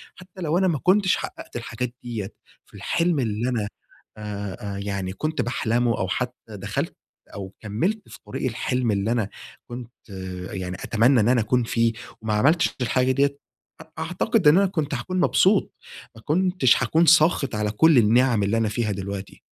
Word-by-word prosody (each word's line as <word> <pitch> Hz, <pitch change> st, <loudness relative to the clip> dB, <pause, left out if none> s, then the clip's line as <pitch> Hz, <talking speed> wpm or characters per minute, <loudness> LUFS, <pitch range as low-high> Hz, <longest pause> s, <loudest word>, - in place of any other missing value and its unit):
حتى 185 Hz, 0 st, -13 dB
لو 165 Hz, 0 st, +1 dB
أنا 190 Hz, +1 st, +3 dB
ما 160 Hz, -6 st, 0 dB
كنتش 190 Hz, 0 st, +4 dB
حققت -, -, -8 dB
الحاجات 120 Hz, +1 st, -4 dB
ديّة 115 Hz, -5 st, -4 dB, 0.4 s
في -, -, -27 dB
الحلم 170 Hz, -2 st, 0 dB
اللي 115 Hz, 0 st, -1 dB
أنا 115 Hz, -5 st, -1 dB, 0.5 s
آآ، 100 Hz, -1 st, -5 dB
يعني 100 Hz, -2 st, -3 dB
كنت 155 Hz, +9 st, -2 dB
باحلمه 120 Hz, -1 st, 0 dB
أو 95 Hz, -, -1 dB
حتى 125 Hz, +6 st, -2 dB, 0.2 s
دخلت 100 Hz, +1 st, -3 dB, 0.4 s
أو 95 Hz, -1 st, -7 dB
كمِّلت 165 Hz, -, -2 dB
في -, -, -12 dB
طريق -, -, -3 dB
الحلم 125 Hz, +1 st, -1 dB
اللي 100 Hz, +2 st, 0 dB
أنا 115 Hz, -4 st, 0 dB, 0.4 s
كنت 120 Hz, 0 st, -8 dB, 0.6 s
يعني 90 Hz, -1 st, -4 dB
أتمنى 120 Hz, +6 st, +3 dB
إن 110 Hz, +2 st, +3 dB
أنا 125 Hz, -2 st, +4 dB
أكون 120 Hz, +3 st, +1 dB
فيه 115 Hz, 0 st, +1 dB, 0.3 s
وما 110 Hz, -1 st, -2 dB
عملتش 145 Hz, +11 st, +3 dB
الحاجة 130 Hz, +1 st, +2 dB
ديّة، 140 Hz, +1 st, +1 dB, 0.6 s
أعتقد 180 Hz, -, +1 dB
إن 150 Hz, +4 st, +7 dB
أنا 200 Hz, -, +5 dB
كنت 155 Hz, -6 st, -2 dB
هاكون 185 Hz, +9 st, -3 dB
مبسوط، 190 Hz, +2 st, +3 dB, 0.4 s
ما 110 Hz, -, -13 dB
كنتش 175 Hz, -3 st, +2 dB
هاكون 165 Hz, +2 st, +3 dB
ساخط 155 Hz, -6 st, +4 dB
على 105 Hz, -1 st, -1 dB
كل 155 Hz, +7 st, +5 dB
النعم 115 Hz, 0 st, +4 dB
اللي 100 Hz, +3 st, +1 dB
أنا 115 Hz, -1 st, +1 dB
فيها 110 Hz, 0 st, -1 dB
دلوقتي. 100 Hz, 0 st, -6 dB
120 Hz, 165 wpm, -24 LUFS, 105-155 Hz, 0.6 s, إن